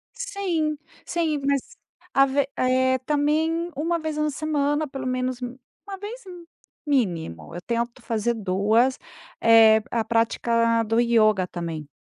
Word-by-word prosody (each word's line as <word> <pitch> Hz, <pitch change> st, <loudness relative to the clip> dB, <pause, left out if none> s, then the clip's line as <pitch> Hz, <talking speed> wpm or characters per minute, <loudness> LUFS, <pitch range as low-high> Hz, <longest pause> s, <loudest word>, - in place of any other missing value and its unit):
Sim, 385 Hz, -11 st, -2 dB, 0.3 s
sim. 320 Hz, -3 st, -1 dB
Mas, 280 Hz, -2 st, -1 dB, 0.4 s
ave 275 Hz, 0 st, +3 dB
eh, 260 Hz, 0 st, +2 dB
também 310 Hz, +4 st, 0 dB
uma 335 Hz, +3 st, -1 dB
vez 310 Hz, -1 st, -4 dB
na 305 Hz, 0 st, +1 dB
semana, 295 Hz, 0 st, -1 dB
pelo 265 Hz, -1 st, -7 dB
menos 255 Hz, 0 st, -2 dB
um 245 Hz, +1 st, -6 dB, 0.3 s
uma 390 Hz, -1 st, -6 dB
vez, 440 Hz, +5 st, -8 dB, 0.6 s
mínimo, 170 Hz, -, -2 dB
eu 175 Hz, -, -6 dB
tento 235 Hz, +2 st, -2 dB
fazer 230 Hz, +1 st, -1 dB
2, 215 Hz, +6 st, +1 dB, 0.4 s
eh, 225 Hz, -1 st, +7 dB
a 230 Hz, -2 st, -1 dB
prática 230 Hz, 0 st, +1 dB
do 225 Hz, +2 st, +1 dB
ioga 215 Hz, -5 st, +3 dB
também. 165 Hz, -4 st, -6 dB
255 Hz, 130 wpm, -24 LUFS, 225-305 Hz, 0.6 s, eh